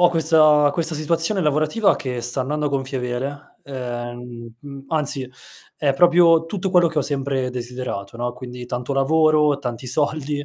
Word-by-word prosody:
ho 175 Hz, -1 st, +5 dB
questa 155 Hz, -3 st, +4 dB
questa 165 Hz, +1 st, -1 dB
situazione 165 Hz, +6 st, +1 dB
lavorativa 155 Hz, +7 st, +1 dB
che 125 Hz, -3 st, -4 dB
sta 120 Hz, +3 st, 0 dB
andando 150 Hz, +3 st, -2 dB
a -, -, +1 dB
gonfie 135 Hz, -1 st, -3 dB
vele, 135 Hz, +4 st, -5 dB
ehm, 120 Hz, -2 st, -7 dB
mhmm, 140 Hz, -1 st, -10 dB
anzi 140 Hz, -5 st, -1 dB, 0.5 s
è 145 Hz, -2 st, +1 dB
proprio 170 Hz, 0 st, +5 dB
tutto 190 Hz, +1 st, -3 dB
quello 180 Hz, -2 st, +4 dB
che 160 Hz, -, -3 dB
ho -, -, +2 dB
sempre 135 Hz, -2 st, -1 dB
desiderato, 125 Hz, -4 st, -6 dB
no, 120 Hz, +1 st, -3 dB
quindi 125 Hz, -1 st, -9 dB
tanto 125 Hz, +2 st, -4 dB
lavoro, 150 Hz, +1 st, +3 dB
tanti 125 Hz, -1 st, -6 dB
soldi, 145 Hz, +1 st, -1 dB
140 Hz, 160 wpm, -21 LUFS, 125-155 Hz, 0.5 s, ho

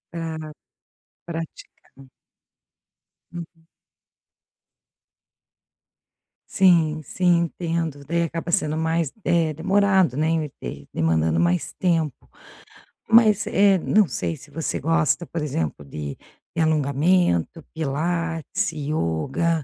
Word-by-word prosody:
Aham, 160 Hz, -2 st, -5 dB, 0.7 s
praticar. 165 Hz, -4 st, -9 dB, 1.3 s
Uhum. 165 Hz, -1 st, -10 dB, 2.8 s
Sim, 165 Hz, -5 st, +3 dB
sim. 175 Hz, +4 st, +2 dB
Entendo, 165 Hz, -3 st, -3 dB
daí 170 Hz, +4 st, 0 dB
acaba 165 Hz, +1 st, -4 dB
sendo 155 Hz, -5 st, +1 dB
mais, 160 Hz, -1 st, 0 dB
eh, 165 Hz, -2 st, +2 dB
demorado, 190 Hz, -3 st, +2 dB
né, 155 Hz, 0 st, +1 dB
de 70 Hz, +3 st, -7 dB
demandando 80 Hz, 0 st, +1 dB
mais 85 Hz, +1 st, +1 dB
tempo. 165 Hz, -7 st, -1 dB, 0.8 s
Mas, 220 Hz, -2 st, +5 dB
eh, 200 Hz, -2 st, +4 dB
não 205 Hz, +3 st, +3 dB
sei 90 Hz, -, -3 dB
se -, -, -15 dB
você 165 Hz, -, -3 dB
gosta, 165 Hz, +1 st, +1 dB
por 165 Hz, -, -4 dB
exemplo, 80 Hz, -, -3 dB
de 70 Hz, 0 st, -6 dB, 0.4 s
de 165 Hz, -, +1 dB
alongamento, 155 Hz, -, +2 dB
pilates, 165 Hz, +5 st, -2 dB
ioga, 150 Hz, -, -1 dB
160 Hz, 95 wpm, -23 LUFS, 140-170 Hz, 2.8 s, Mas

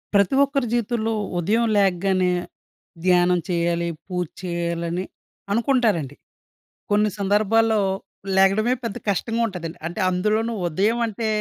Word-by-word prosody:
ప్రతి 200 Hz, +6 st, +4 dB
ఒక్కరి 275 Hz, -2 st, 0 dB
జీవితంలో 235 Hz, -1 st, 0 dB, 0.3 s
ఉదయం 220 Hz, +7 st, +1 dB
లేగ్గానే 190 Hz, -1 st, +2 dB, 0.7 s
ధ్యానం 180 Hz, -1 st, +4 dB
చేయాలి, 170 Hz, -1 st, 0 dB, 0.2 s
పూజ 180 Hz, -2 st, -2 dB, 0.2 s
చేయాలి 170 Hz, -1 st, -2 dB
అని 180 Hz, +2 st, -2 dB, 0.5 s
అనుకుంటారండి. 220 Hz, -, +1 dB, 0.8 s
కొన్ని 210 Hz, +1 st, +3 dB
సందర్భాల్లో, 215 Hz, +3 st, +2 dB, 0.6 s
లెగడమే 200 Hz, +5 st, +4 dB
పెద్ద 230 Hz, -4 st, -3 dB
కష్టంగా 225 Hz, +4 st, 0 dB
ఉంటదండి. 175 Hz, -5 st, -6 dB
అంటే 175 Hz, +6 st, -6 dB
అందులోనూ 215 Hz, +5 st, 0 dB
ఉదయం 205 Hz, +8 st, +1 dB
అంటే, 220 Hz, +1 st, -3 dB
200 Hz, 110 wpm, -23 LUFS, 180-225 Hz, 0.8 s, ప్రతి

